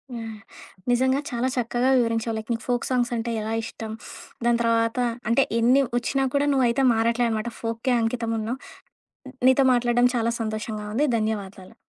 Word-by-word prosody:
Yeah! 225 -1 -6 0.6
నిజంగా 260 +3 +2
చాలా 245 0 -1
చక్కగా 245 +1 0
వివరించావు. 230 -1 0
లైక్ 220 +2 -7
నీకు 230 0 -2
ఫోక్ 245 -1 0
సాంగ్స్ 245 -2 +1
అంటే 235 0 -2
ఎలా 220 +1 -3
ఇష్టం, 225 -1 -7 0.5
దాని 235 0 +3
తర్వాత 230 +1 +1 0.3
అంటే 250 +4 +4 0.2
ఎన్ని 255 +4 +4 0.2
ఒచ్చినా 270 +3 0
కూడా 285 +1 +2
నువ్వయితే 260 0 +2
మారట్లేదన్నమాట. 230 0 0
ఫోక్‌కే 230 +3 -1
అంకితం 225 0 -1
ఉన్నావు. 230 +5 -3 0.9
నీతో 265 +1 +5
మాట్లాడడం 245 0 +3
చాలా 235 0 +1
సంతోషంగా 215 -1 -4
ఉంది. 290 +6 +2
ధన్యవాదాలు. 200 -4 -4
235 Hz, 145 wpm, -24 LUFS, 225-245 Hz, 0.9 s, నీతో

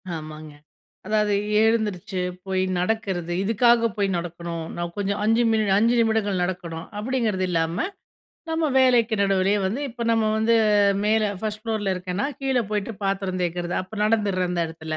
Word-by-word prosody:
ஆமாங்க. 155 -1 -8 0.5
அதாவது 210 -1 +1 0.3
எழுந்துருச்சு 215 -5 0 0.3
போய் 190 -1 0 0.2
நடக்கிறது. 180 -3 -1
இதுக்காக 230 +2 +4
போய் 200 -1 +1
நடக்கணும், 170 -1 -5
நான் 175 0 -4
கொஞ்சம் 200 0 -1
5 225 +3 +3
மினி 220 -1 +2
5 230 +3 +3
நிமிடங்கள் 220 -4 +1
நடக்கணும், 170 -3 -4
அப்பிடிங்கிறது 215 -4 -1
இல்லாம, 165 0 0 0.7
நம்ம 320 0 +1
வேலைக்கு 245 -3 +4
நடுவிலேயே 195 +1 +2
வந்து, 220 +9 -2
இப்போ 235 0 -6
நம்ம 225 -1 +2
வந்து 220 +1 +3 0.5
மேல, 215 +1 +3 0.2
ஃபர்ஸ்ட் 215 -1 -3
ஃப்ளோர்ல 215 -4 -1
இருக்கேன்னா, 180 +6 -2
கீழ 265 -2 +1
போய்ட்டு 210 +1 -2
பாத்திரம் 195 -1 -1
தேய்க்கிறது. 175 0 -2
அப்ப 195 +3 -9
நடந்துடுறேன், 200 -5 +1
அந்த 175 -1 0
இடத்துல. 160 -1 -6
200 Hz, 145 wpm, -24 LUFS, 180-225 Hz, 0.7 s, இதுக்காக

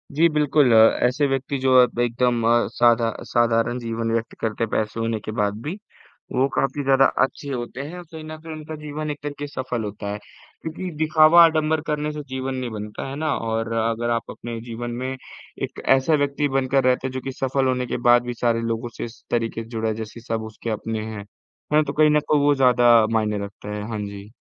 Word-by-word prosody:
जी 165 +3 +5
बिल्कुल। 150 -3 +3
अ, - - +7 0.3
ऐसे 130 +4 +2
व्यक्ति 135 +1 -2
जो 130 -1 +4
अब 120 -1 +1
एकदम 120 0 +1
अ, 120 0 +3
साधा 120 -1 +4 0.2
साधारण 120 +1 +2
जीवन 115 -1 -3
व्यक्त 115 0 -2
करके 115 0 -2
हैं, 115 - -2
पैसे 110 +1 -1
होने 115 -1 -1
के 110 - -6
बाद 105 0 0
भी 165 +7 -4 0.6
वो 130 +2 +3
काफ़ी 145 +1 0
ज़्यादा 135 0 +5 0.2
अच्छे 140 +2 -3
होते 125 +1 -5
हैं। 160 +6 -7
औ 175 - -9
कहीं 160 -1 -8
न 155 0 -8
कहीं 160 0 -8
उनका 155 0 -7
जीवन 150 0 -5
एक 145 - -7
तरीक़े 145 0 -5
सफल 130 -4 -4
होता 105 0 -6
है। - - -4 0.4
क्योंकि 165 +3 -5
दिखावा 155 +2 +6
आडंबर 160 -1 +2
करने 150 0 -1
से 150 - -6
जीवन 130 0 -3
नहीं 125 -2 -3
बनता, 105 +3 -6
है 135 - -5
ना। 155 0 -1
और 115 0 -2
अगर 115 +1 0
आप 115 0 -1
अपने 115 -1 -7
जीवन 120 0 -6
में 130 +1 -2 0.5
एक - - -5
ऐसा 135 +4 +1
व्यक्ति 145 0 0
बनकर 135 0 +2
रहते 130 +1 +2
हैं - - -6
जो 130 - -4
कि 135 - -5
सफल 135 +1 0
होने 125 -1 0
के - - -2
बाद 120 0 +6
भी 120 - -3
सारे 115 -1 0
लोगों 115 +1 -2
से - - -3
इस 115 0 -12
तरीक़े 115 -1 -1
से 115 - -15
जुड़ा 110 -1 -1
जैसे 110 +1 -8
सब 115 -1 -3
उसके 115 - -7
अपने 110 0 -3
हैं। 110 -2 -7 0.5
हाँ, 155 +1 +5
तो 140 - -4
कहीं 155 0 +4
न 150 0 +4
को 150 - +3
वो 145 0 +4
ज़्यादा 120 -3 +5
मायने 105 -2 0
रखता 100 +1 -11
है। 105 - -4
हाँ 110 -2 -3
जी। 100 0 -9
125 Hz, 220 wpm, -23 LUFS, 115-145 Hz, 0.6 s, अ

